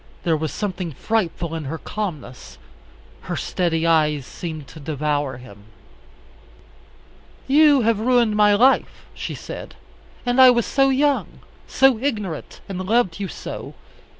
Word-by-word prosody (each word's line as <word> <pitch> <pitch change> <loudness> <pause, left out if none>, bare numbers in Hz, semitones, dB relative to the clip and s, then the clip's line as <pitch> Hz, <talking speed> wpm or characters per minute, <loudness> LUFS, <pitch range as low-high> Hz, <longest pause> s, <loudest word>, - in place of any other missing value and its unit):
There 165 -2 +2
was 155 -1 -3
something 185 -5 -4
frightful 175 - -2
in 160 -2 -4
her 155 +4 -4
calmness. 150 - -6 0.7
Her - - -1
steady 170 -2 -1
eyes 150 -4 +2
seemed 155 -3 -7
to 160 - -12
devour 145 -2 -2
him. 105 -5 -14 1.8
"You 290 0 +5
have 225 -2 +1
ruined 235 -2 +2
my 210 -1 +5
life," 255 +6 +2
she - - -6
said; - - -9 0.5
"and 245 +1 +3
I 260 - +10
was 240 -2 +3
so 270 -1 +2
young, 280 +1 0 0.3
so 265 -4 +3
ignorant, 210 - -4
and 190 -2 -5
loved 205 -2 +1
you 200 - -3
so. - - -8
185 Hz, 135 wpm, -22 LUFS, 155-240 Hz, 1.8 s, I